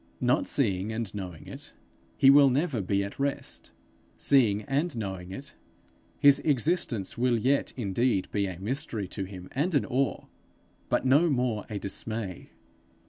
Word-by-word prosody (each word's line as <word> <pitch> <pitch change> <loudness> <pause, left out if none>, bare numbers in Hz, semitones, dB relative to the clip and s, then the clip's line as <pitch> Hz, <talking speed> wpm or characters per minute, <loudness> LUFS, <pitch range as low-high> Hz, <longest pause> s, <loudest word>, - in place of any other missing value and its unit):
Not 125 +1 +2
seeing 105 -6 0
and 110 -2 -4
knowing 90 -6 -7
it, - - -9 0.4
he 135 - +7
will 140 -1 +7
never 135 -3 0
be 100 +1 0
at 100 +5 -7
rest; 140 0 -3 0.5
seeing 110 -7 +3
and 145 +1 -1
knowing 95 -4 -5
it, 135 +9 -8 0.7
his 140 -1 +6
existence 135 - 0
will 125 -1 +3
yet 135 +5 +1
indeed 115 -1 0
be 100 -1 0
a 90 -2 -6
mystery 110 - -3
to 100 -1 -4
him 90 -1 -9
and 155 +5 0
an 145 - +2
awe, 135 +1 -1 0.6
but - - +1
no 145 +6 +5
more 125 -6 0
a 105 - -3
dismay. 100 -1 -5
115 Hz, 150 wpm, -28 LUFS, 100-140 Hz, 0.7 s, he